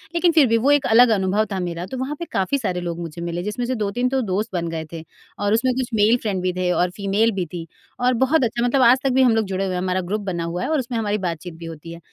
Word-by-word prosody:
लेकिन 345 0 +4
फिर 315 -4 +5
भी 230 0 +3
वो 260 +6 +2
एक 290 -1 +3
अलग 240 +2 +6
अनुभव 200 +1 +1
था 195 - -2
मेरा 175 -1 -4
तो 230 +8 -7
वहाँ 260 +4 -3
पे 340 - -4
काफ़ी 195 +9 0
सारे 185 -9 -2
लोग 170 -1 -4
मुझे 170 0 -7
मिले 170 0 -3
जिसमें 210 +5 -3
से 255 +1 -1
2-3 220 +3 -1
तो 265 0 0
दोस्त 205 -1 -2
बन 170 -2 -1
गए 160 -1 -4
थे। 165 -1 -7 0.4
और 205 0 +1
उसमें 250 +3 +2
कुछ 260 -1 -2
मेल 220 +2 +4
फ्रेंड 200 -4 -2
भी 180 0 -1
थे 180 0 -1
और 180 0 +1
फ़ीमेल 205 +3 +1
भी 190 -4 -2
थी 170 -2 -5 0.3
और 250 +1 +2
बहुत 275 +2 +3
अच्छा 235 0 -1
मतलब 260 +2 +2
आज 250 +1 +6
तक 270 - +2
भी 265 - +4
हम 245 -3 +4
लोग 225 -1 +1
जुड़े 195 0 -2
हुए 185 - -2
हैं, 180 - -2
हमारा 185 0 0
ग्रुप 200 +4 -3
बना 180 -4 -3
हुआ 170 +2 -3
है - - -2
और 315 -2 +1
उसमें 245 -2 -3
हमारी 210 -2 0
बातचीत 175 -2 -4
भी 165 +1 -10
होती 165 0 -9
है। 170 - -10
205 Hz, 295 wpm, -22 LUFS, 180-245 Hz, 0.4 s, अलग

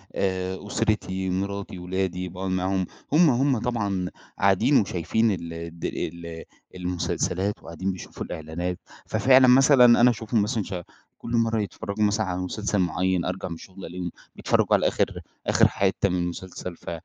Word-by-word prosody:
آآ، 95 -1 -1
أسرتي 95 -3 -1
مراتي، 100 +1 -3
ولادي 90 0 -2
باقعد 95 +2 -4
معاهم، 95 0 0 0.3
هُم 160 0 +6
هُم 130 +1 +2
طبعًا 100 -7 -1 0.3
قاعدين 100 +8 +4
وشايفين 105 +4 +1
ال 85 -3 -4
الد 85 0 -5 0.3
المسلسلات 90 +2 -1
وقاعدين 95 +4 -3
بيشوفوا 90 - -7
الإعلانات 85 +2 -4 0.3
ففعلًا 130 0 +5
مثلًا 130 0 +7 0.2
أنا 125 - +7
أشوفهم 110 -1 0
مثلًا 105 +1 0
ش 95 - -7 0.4
كل 115 - -8
مرة 115 -1 +2
يتفرجوا 100 +2 -3
مثلًا 105 +1 +1
على 90 -1 -2
مسلسل 105 +2 -1
معين 90 0 +1
أرجع 90 +1 -3
من 85 - -5
الشغل 95 +3 -11
ألاقيهم 90 -1 -5 0.2
بيتفرجوا - - +1
على - - +2
آخر - - -1 0.3
آخر - - +5
حتّة 100 0 +1
من 90 - 0
المسلسل 90 0 -6
ف - - -9
95 Hz, 150 wpm, -25 LUFS, 90-105 Hz, 0.4 s, مثلًا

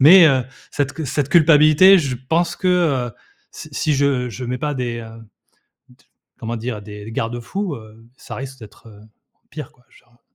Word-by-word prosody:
Mais, 170 +5 +9
heu, 130 -4 +2 0.3
cette 145 0 -1
cu 155 +1 -5
cette 140 +1 -1
culpabilité 160 +3 +6
je 135 -6 -2
pense 170 +1 +1
que, 185 - -4 0.4
heu, 115 - -11 0.4
si - - -10
si 150 - 0
je 135 -3 +1
je 125 +3 -7
mets 125 +1 -3
pas 150 +2 -2
des, 120 -2 -3
heu, 115 0 -11 0.7
d 125 +2 -24 0.3
comment 115 0 -4
dire? 115 -1 -5
Des 105 0 -10
des 110 - -8
garde-fous, 120 - -3
heu, 110 0 -14
ça - - -9
risque 135 0 -8
d'être, 110 +1 -15
heu, 105 -1 -16 0.5
pire, 150 -3 -8
quoi, 125 - -30
genre. 120 0 -25
130 Hz, 185 wpm, -20 LUFS, 115-150 Hz, 0.7 s, Mais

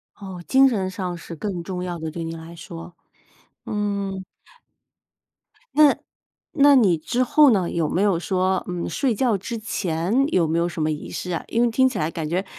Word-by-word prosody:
哦， 190 -3 -8
精 270 0 +6
神 200 -7 0
上 185 -2 -4
是 170 0 -9
更 180 +2 -4
重 180 0 -4
要 175 -2 -4
的， 160 0 -4
对 165 +2 -5
你 165 0 -5
来 165 +1 -10
说， 170 -1 -10 0.7
嗯。 200 -2 -2 1.5
那 300 -1 +7 0.7
那 285 0 +7
你 200 -10 +4
之 235 +10 -2
后 295 +3 +5
呢， 190 -5 +1
有 165 -3 -1
没 180 - 0
有 200 -4 +3
说 185 0 0
嗯， 180 -1 -3
睡 270 -4 0
觉 225 -1 +1
之 230 +5 -5
前 200 +3 0
有 170 -3 +3
没 160 +2 0
有 170 +1 +2
什 170 - -5
么 155 - +1
仪 150 - -5
式 180 - -5
啊？ 170 - -2
因 230 - 0
为 240 - +4
听 260 +3 +3
起 245 -5 -3
来 155 - 0
感 165 -2 -4
觉， 185 +4 -1
185 Hz, 210 characters per minute, -23 LUFS, 170-220 Hz, 1.5 s, 那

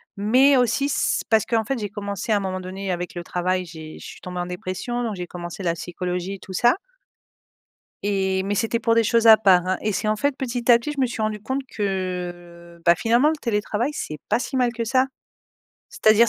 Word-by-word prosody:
Mais 255 +8 +4
aussi 250 +3 +2
s 285 - 0
parce 220 -1 +4
qu'en 225 -2 0
fait 270 +1 -1
j'ai 205 -3 -3
commencé 200 +1 -4
à 210 - +4
un - - 0
moment 185 -1 -3
donné 190 +1 -5
avec 175 0 -4
le 175 -1 -5
travail 180 +1 -1
j'ai 160 -2 -10
je - - -11
suis - - -11
tombée 180 -1 -6
en 175 - -1
dépression 185 +7 -4
donc 220 -3 -2
j'ai 180 -1 -5
commencé 175 +2 -7
la 170 -1 +1
psychologie 180 +2 -4
et - - -12
tout 190 - -10
ça 240 - +4 1.3
et 190 -2 0
mais 205 +1 -1
c'était 225 +3 0
pour 230 -1 +2
des 230 - +4
choses 230 +1 +3
à 220 - +11
part, 185 -4 +4
hein, 185 - +1
et 215 - 0
c'est 215 - -2
en 215 - +2
fait 285 +5 0
petit 245 -2 +1
à 235 - +7
petit 295 +5 -4
je 275 - -2
me - - +4
suis 235 -2 -4
rendue 215 -1 -1
compte 265 +4 -2
que, 175 -3 -4
bah, 170 0 +6
finalement 235 - +3
le 320 - 0
télétravail 225 -1 -1
c'est 155 - -5
pas - - +3
si 265 - -4
mal 250 -2 +2
que 230 -1 -3
ça. 260 +3 +2 0.8
C'est-à-dire 220 +1 +5
205 Hz, 230 wpm, -23 LUFS, 180-235 Hz, 1.3 s, à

